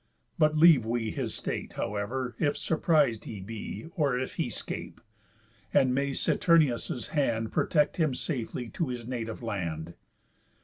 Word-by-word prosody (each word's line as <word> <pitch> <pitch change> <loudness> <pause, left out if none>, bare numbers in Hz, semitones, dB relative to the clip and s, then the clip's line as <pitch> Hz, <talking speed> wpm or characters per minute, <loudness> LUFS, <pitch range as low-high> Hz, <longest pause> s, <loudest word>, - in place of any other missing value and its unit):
But 155 0 +4
leave 155 -6 +7
we 115 -1 -1
His - - -3
state, - - -4
however, 120 +5 -3
if 145 -2 +1
surpris'd 150 -8 +2
he 105 - -6
be, 110 +9 -6
Or 140 -6 +2
if 130 +1 -3
he - - -1
scape. - - -6 0.8
And 130 -1 +5
may 140 +2 +1
Saturnius' 135 -5 +2
hand 115 -7 0
Protect 150 -2 +2
him 155 -6 +2
safely 125 -4 -3
to 165 - -2
his 120 -2 -5
native 115 -2 -4
land. 85 -7 -3
125 Hz, 140 wpm, -29 LUFS, 115-150 Hz, 0.8 s, leave